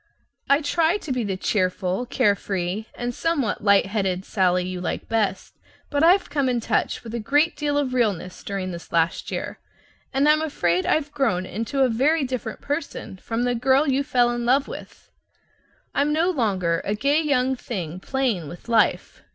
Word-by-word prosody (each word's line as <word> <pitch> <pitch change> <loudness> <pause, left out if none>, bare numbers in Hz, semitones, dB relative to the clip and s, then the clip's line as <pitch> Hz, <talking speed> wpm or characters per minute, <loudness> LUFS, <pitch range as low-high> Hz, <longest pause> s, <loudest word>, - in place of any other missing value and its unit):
I 280 +3 +4
try 330 +5 +2
to 315 - -7
be 250 -2 0
the 195 -3 -2
cheerful, 185 +3 -1
carefree 200 -5 0
(and 245 0 -3
somewhat 290 -9 -1
light 200 -1 +5
headed) 190 -2 -1
Sallie 180 -2 +1
you 185 -1 -5
like 180 - -3
best; 215 -4 -1 0.4
but 290 +1 +1
I've 365 +4 +5
come 280 -3 0
in 245 -1 +1
touch 230 - -1
with 230 -1 -8
a 235 - -2
great 290 +9 +2
deal 290 -1 -1
of 275 -3 0
REALNESS 205 -7 -1
during 195 -2 -3
this 170 -1 -9
last 165 0 0
year, - - -5 0.5
and 275 +2 +2
I'm 305 +1 +5
afraid 185 - 0
I've 295 -1 +1
grown 260 -11 0
into 230 +9 -1
a - - +5
very 275 +7 +2
different 250 -4 -4
person 285 - -4
from 225 +5 -3
the 245 0 +1
girl 265 +5 +3
you 275 +1 +2
fell 245 -4 +2
in 240 0 -2
love 265 +4 +3
with. - - -10 0.8
I'm 285 +1 +1
no 330 +4 +2
longer 190 - 0
a 205 - -1
gay 285 +8 +2
young 265 -4 +1
thing 185 -9 -5
playing 235 - -1
with 175 +8 -11
life. 230 -2 +1
240 Hz, 180 wpm, -23 LUFS, 195-280 Hz, 0.8 s, light